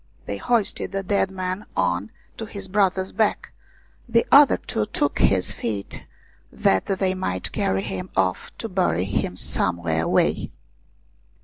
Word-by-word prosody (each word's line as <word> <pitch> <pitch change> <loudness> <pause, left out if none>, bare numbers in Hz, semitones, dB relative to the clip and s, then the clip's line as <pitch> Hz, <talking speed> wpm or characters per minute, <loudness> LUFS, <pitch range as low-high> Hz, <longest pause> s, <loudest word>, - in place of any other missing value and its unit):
They 100 - -4
hoisted 225 - 0
the 195 0 -2
dead 195 0 +1
man 185 +1 -4
on 90 +3 0 0.3
to 225 - -5
his 200 -2 -6
brother's 190 -1 +1
back, 220 -2 0 0.6
the 230 0 +3
other 285 0 +8
two 105 - -3
took 145 - -1
his 95 -2 +3
feet 105 -4 -5 0.4
that 95 0 +1
they 190 -1 0
might 140 - -3
carry 95 0 0
him 95 -3 -5
off 95 -1 0
to 225 - -4
bury 180 - +1
him 95 -2 -2
some 85 - +1
where 80 -1 -1
away. - - +1
180 Hz, 145 wpm, -23 LUFS, -, 0.6 s, other